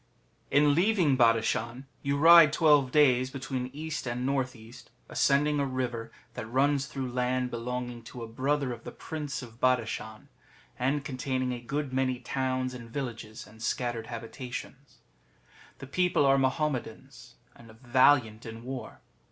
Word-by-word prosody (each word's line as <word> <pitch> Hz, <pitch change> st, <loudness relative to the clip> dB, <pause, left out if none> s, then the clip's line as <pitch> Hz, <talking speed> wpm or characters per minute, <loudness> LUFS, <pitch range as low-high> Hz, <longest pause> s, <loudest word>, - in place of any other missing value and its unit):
In 145 Hz, 0 st, +4 dB
leaving 175 Hz, -4 st, +3 dB
Badashan 115 Hz, +1 st, +1 dB, 0.2 s
you 140 Hz, 0 st, 0 dB
ride 165 Hz, 0 st, +8 dB
twelve 150 Hz, -4 st, +4 dB
days 130 Hz, -4 st, +4 dB
between 130 Hz, -1 st, -4 dB
east 150 Hz, -1 st, -5 dB
and 125 Hz, +1 st, -2 dB
north 135 Hz, -2 st, -1 dB
east, 115 Hz, +1 st, -14 dB, 0.2 s
ascending 145 Hz, +1 st, +2 dB
a 140 Hz, -, +1 dB
river 125 Hz, -3 st, -3 dB, 0.2 s
that 110 Hz, -, -6 dB
runs 140 Hz, +2 st, +2 dB
through 135 Hz, -3 st, -5 dB
land 125 Hz, 0 st, -1 dB
belono 125 Hz, +1 st, -3 dB
insf -, -, -25 dB
to 120 Hz, 0 st, -8 dB
a -, -, -6 dB
brother 135 Hz, +3 st, -1 dB
of 115 Hz, -, -11 dB
the -, -, -7 dB
Prince 150 Hz, -3 st, -5 dB
of 115 Hz, -1 st, -13 dB
Badashan, 110 Hz, -4 st, -1 dB, 0.5 s
and 135 Hz, +3 st, 0 dB
containing 130 Hz, -1 st, -2 dB
a 120 Hz, -, -6 dB
good 140 Hz, +2 st, -3 dB
many 130 Hz, -1 st, +1 dB
towns 130 Hz, 0 st, -2 dB
and 120 Hz, -2 st, -9 dB
villages 115 Hz, -4 st, -6 dB
and 110 Hz, +1 st, -16 dB
scattered 120 Hz, 0 st, -2 dB
habitations. 125 Hz, +3 st, -8 dB, 0.8 s
The 135 Hz, -, -9 dB
people 175 Hz, +2 st, +2 dB
are 135 Hz, 0 st, +4 dB
Mahommetans, 130 Hz, -3 st, -3 dB, 0.2 s
and 115 Hz, -, -16 dB
valiant 125 Hz, -3 st, +3 dB
in 115 Hz, 0 st, -9 dB
war. 130 Hz, 0 st, -7 dB
130 Hz, 150 wpm, -29 LUFS, 120-140 Hz, 0.8 s, ride